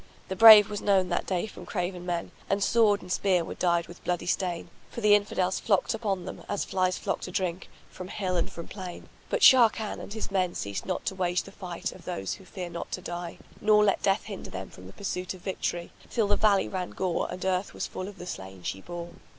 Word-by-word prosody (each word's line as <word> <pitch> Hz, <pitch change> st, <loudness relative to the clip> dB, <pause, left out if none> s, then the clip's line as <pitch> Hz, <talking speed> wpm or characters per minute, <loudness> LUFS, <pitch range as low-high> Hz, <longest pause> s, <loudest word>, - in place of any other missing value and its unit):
The 190 Hz, -, -2 dB
brave 215 Hz, -1 st, +10 dB
was 210 Hz, -1 st, -4 dB
known 190 Hz, -3 st, +3 dB
that 175 Hz, -, -1 dB
day 185 Hz, +1 st, 0 dB
from 215 Hz, -, -10 dB
craven 180 Hz, -1 st, -3 dB
men, 175 Hz, -1 st, -2 dB, 0.2 s
and 200 Hz, 0 st, +1 dB
sword 210 Hz, -4 st, +3 dB
and 180 Hz, -, -8 dB
spear 185 Hz, -3 st, +2 dB
were -, -, -5 dB
dyed 170 Hz, -1 st, +1 dB
with 175 Hz, -, -13 dB
bloody 175 Hz, -1 st, -1 dB
stain; 175 Hz, -2 st, -2 dB, 0.2 s
for -, -, -7 dB
the 210 Hz, -2 st, +5 dB
Infidels 190 Hz, -3 st, +2 dB
flocked 200 Hz, -4 st, +1 dB
up 225 Hz, -1 st, -5 dB
on 190 Hz, -3 st, -1 dB
them, -, -, -7 dB
as 205 Hz, -, -1 dB
flies 185 Hz, -1 st, 0 dB
flock -, -, -2 dB
to -, -, -5 dB
drink, 180 Hz, 0 st, -2 dB, 0.2 s
from 185 Hz, -, -8 dB
hill 185 Hz, -2 st, -2 dB
and 170 Hz, -, 0 dB
from 170 Hz, -, -8 dB
plain; 185 Hz, -3 st, -8 dB, 0.2 s
but -, -, 0 dB
Sharrkan 225 Hz, -4 st, +6 dB
and -, -, -8 dB
his 220 Hz, -1 st, -5 dB
men 185 Hz, -2 st, 0 dB
ceased 100 Hz, -1 st, -4 dB
not 185 Hz, -, -2 dB
to -, -, -1 dB
wage 180 Hz, -1 st, 0 dB
the 195 Hz, -, -12 dB
fight 180 Hz, -3 st, -5 dB
of -, -, -14 dB
those 95 Hz, 0 st, -3 dB
who 190 Hz, -, -11 dB
fear 180 Hz, -2 st, -6 dB
not 170 Hz, -, -6 dB
to 185 Hz, -, -3 dB
die, 175 Hz, -1 st, -6 dB, 0.2 s
nor 210 Hz, 0 st, +5 dB
let 200 Hz, -2 st, +2 dB
death 195 Hz, +1 st, +2 dB
hinder 200 Hz, -3 st, -7 dB
them 95 Hz, 0 st, -7 dB
from 90 Hz, -, -12 dB
the 95 Hz, -, -12 dB
pursuit 185 Hz, -2 st, -4 dB
of 185 Hz, -, -14 dB
victory, 175 Hz, -2 st, -3 dB, 0.2 s
till 225 Hz, -3 st, +1 dB
the 205 Hz, -, +3 dB
valley 205 Hz, -2 st, +3 dB
ran 185 Hz, -2 st, -3 dB
gore 185 Hz, -2 st, -1 dB
and 185 Hz, -, -5 dB
earth 190 Hz, +1 st, -1 dB
was -, -, -2 dB
full 185 Hz, -, -6 dB
of 200 Hz, -1 st, -10 dB
the 175 Hz, -, -8 dB
slain 95 Hz, -, -8 dB
she 95 Hz, -, -4 dB
bore. 175 Hz, -, -7 dB
185 Hz, 240 wpm, -28 LUFS, 175-200 Hz, 0.2 s, brave